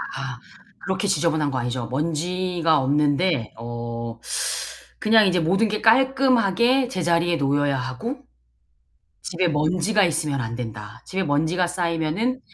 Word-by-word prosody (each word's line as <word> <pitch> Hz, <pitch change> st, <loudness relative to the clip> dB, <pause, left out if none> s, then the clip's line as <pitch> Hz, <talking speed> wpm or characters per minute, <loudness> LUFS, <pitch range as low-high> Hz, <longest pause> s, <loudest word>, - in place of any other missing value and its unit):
아. -, -, -5 dB, 0.5 s
그렇게 190 Hz, +1 st, -1 dB
지저분한 160 Hz, -6 st, +1 dB
거 130 Hz, -2 st, -2 dB
아니죠. 120 Hz, 0 st, -3 dB
먼지가 165 Hz, +3 st, 0 dB
없는데 145 Hz, 0 st, +1 dB
어 115 Hz, 0 st, -6 dB, 0.8 s
그냥 220 Hz, -1 st, +5 dB
이제 180 Hz, -1 st, +2 dB
'모든 195 Hz, +7 st, +2 dB
게 215 Hz, -, -2 dB
깔끔하게 255 Hz, -1 st, +3 dB
제자리에 170 Hz, -4 st, +1 dB
놓여야 140 Hz, -1 st, +1 dB
하고, 130 Hz, -, -4 dB, 1.1 s
집에 180 Hz, 0 st, 0 dB
먼지가 175 Hz, +7 st, +2 dB
있으면 155 Hz, -5 st, 0 dB
안된다. 115 Hz, -1 st, -6 dB
집에 190 Hz, 0 st, -2 dB
먼지가 160 Hz, +4 st, +1 dB
쌓이면은 175 Hz, +8 st, -1 dB
165 Hz, 280 characters per minute, -23 LUFS, 140-190 Hz, 1.1 s, 그냥